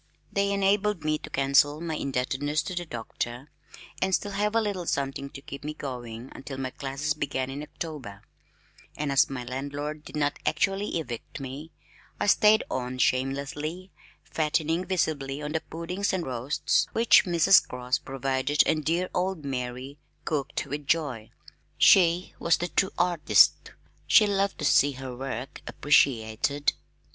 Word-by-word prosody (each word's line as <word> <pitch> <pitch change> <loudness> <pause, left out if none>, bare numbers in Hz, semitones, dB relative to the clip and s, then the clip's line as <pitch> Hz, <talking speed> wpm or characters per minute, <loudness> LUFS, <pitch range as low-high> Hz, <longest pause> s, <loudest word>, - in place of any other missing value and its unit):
They 200 0 +1
enabled 200 -2 +1
me 155 0 0
to - - -9
cancel 140 +2 +3
my 165 -1 -3
indebtedness 140 +2 -1
to 185 - -5
the 175 -1 -4
Doctor, 120 +2 -5 0.5
and 190 0 +3
still 205 - -3
have 210 +2 -1
a - - +5
little 200 -6 -2
something 140 0 -2
to 135 - -11
keep 140 - -8
me 150 +1 -5
going 125 -4 -7
until 135 0 -8
my 130 -1 -3
classes 140 +2 -2
began 135 -3 -3
in 140 +2 -5
October, 145 -10 -7 0.7
and 150 -1 -2
as 140 +3 +4
my 130 -2 -5
landlord 145 +4 -5
did - - -10
not 145 -1 0
actually 195 +5 0
evict 120 -5 -7
me, 140 +4 -7 0.5
I - - 0
stayed 215 +1 +5
on 130 0 -3
shamelessly, 140 +8 -1 0.3
fattening 160 +2 0
visibly 150 -6 -1
on 150 0 -4
the 160 0 -1
puddings 180 +5 -3
and 185 -3 -1
roasts 135 +5 0
which 230 -1 +5
Mrs. 175 +2 +5
Cross 125 0 -2
provided 135 +2 +1
and 155 -1 +1
dear 170 +4 0
old 180 -4 -1
Mary 130 +1 -5 0.3
cooked 150 -2 -2
with 145 +1 -6
joy. 135 -10 0 0.5
She 175 -1 +5
was 170 - +3
the 175 - -3
true 190 +4 +1
artist. 175 -3 +4 0.3
She 215 - +7
loved 200 -1 0
to 150 - -3
see 145 0 +4
her 130 -1 -7
work 130 0 -6
appreciated. 140 0 +2
150 Hz, 155 wpm, -27 LUFS, 135-170 Hz, 0.7 s, She